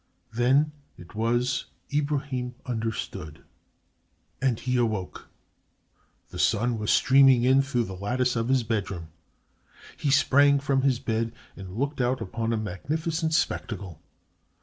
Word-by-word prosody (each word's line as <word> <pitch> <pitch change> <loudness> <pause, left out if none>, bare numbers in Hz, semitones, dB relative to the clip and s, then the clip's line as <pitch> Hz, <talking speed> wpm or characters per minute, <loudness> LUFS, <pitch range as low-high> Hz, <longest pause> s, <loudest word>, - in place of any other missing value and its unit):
Then 135 +6 +3 0.3
it 85 -1 -13
was 120 +4 0 0.3
Ibrahim 140 -4 -1
understood 110 - -4 1.0
and 130 -5 +1
he 125 0 -1
awoke. 110 -6 -2 1.0
The - - -7
sun 115 +1 +1
was 105 - -3
streaming 135 -2 +5
in 130 +2 +5
through 135 -3 0
the 95 - -6
lattice 125 +6 0
of 115 +1 -1
his 130 -2 +3
bedroom. 100 -7 -3 0.9
He 145 - -2
sprang 140 +1 +5
from 135 -1 +1
his 130 -2 +2
bed 115 -1 -2 0.2
and 95 -1 -9
looked 140 +1 -1
out 125 +2 +1
upon 115 +4 -3
a 115 - 0
magnificent 155 - -2
spectacle. 95 - -2
120 Hz, 125 wpm, -26 LUFS, 110-135 Hz, 1.0 s, streaming